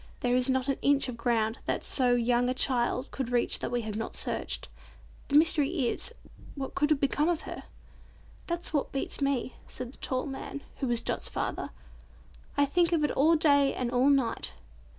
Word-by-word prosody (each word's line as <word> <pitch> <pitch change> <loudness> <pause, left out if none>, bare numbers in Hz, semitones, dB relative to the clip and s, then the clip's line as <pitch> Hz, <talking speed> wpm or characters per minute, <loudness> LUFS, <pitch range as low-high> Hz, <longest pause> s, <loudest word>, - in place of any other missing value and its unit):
"There 245 0 +2
is 255 +1 +2
not 260 0 +1
an 275 - 0
inch 280 -1 +3
of 245 - -5
ground 230 -1 0
that - - -1
so 250 -2 +3
young 245 +1 +2
a 255 - -1
child 255 0 +1
could 265 -3 -3
reach 240 -1 +1
that - - -3
we 245 0 -1
have 215 -2 -5
not 220 +1 -4
searched. - - -2 0.6
The 285 - -1
mystery 300 -2 +3
is, - - -2 0.4
what 270 -2 -5
could 295 - +1
have 305 -3 +3
become 290 +3 +1
of 340 -3 0
her?" - - -8 0.8
"That's 340 0 -3
what 290 - 0
beats 275 +1 -2
me," 275 -2 -1
said 250 0 -7
the - - -11
tall 255 -1 -1
man, 280 0 -6
who 270 - -2
was 240 -1 +1
Dot's - - -2
father. - - -3 0.9
"I 285 - +5
think 340 +4 +2
of 320 -3 +2
it 295 - +2
all 315 +4 +4
day 285 -3 +4
and 245 -2 -2
all 255 +3 +3
night. 265 -5 +1
270 Hz, 195 wpm, -29 LUFS, 245-285 Hz, 0.9 s, I